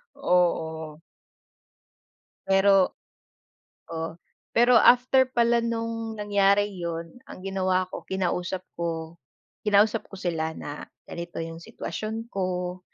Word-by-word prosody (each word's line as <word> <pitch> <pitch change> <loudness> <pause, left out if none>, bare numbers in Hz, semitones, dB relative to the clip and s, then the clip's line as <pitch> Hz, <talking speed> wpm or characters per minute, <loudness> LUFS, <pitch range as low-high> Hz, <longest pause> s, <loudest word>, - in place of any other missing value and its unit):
Oo. 160 -3 0 1.5
Pero 195 -1 +4 0.9
Oo, 165 0 -5 0.3
pero 240 +1 +5
after 255 +2 +5
pala 235 -1 +3
nung 230 -1 -2
nangyari 205 0 +2
yun, 170 +6 -6
ang - - -11
ginawa 185 -1 0
ko - - -8
kinausap 185 0 -2 0.2
ko 165 -1 -4 0.5
kinausap 210 +1 +3
ko - - -7
sila 160 -3 -1
na, 145 -2 -7 0.2
"Ganito 170 0 -6
yung 165 0 -7
sitwasyon 225 0 -5
ko, 180 -1 -2
190 Hz, 100 wpm, -26 LUFS, 170-220 Hz, 1.5 s, pero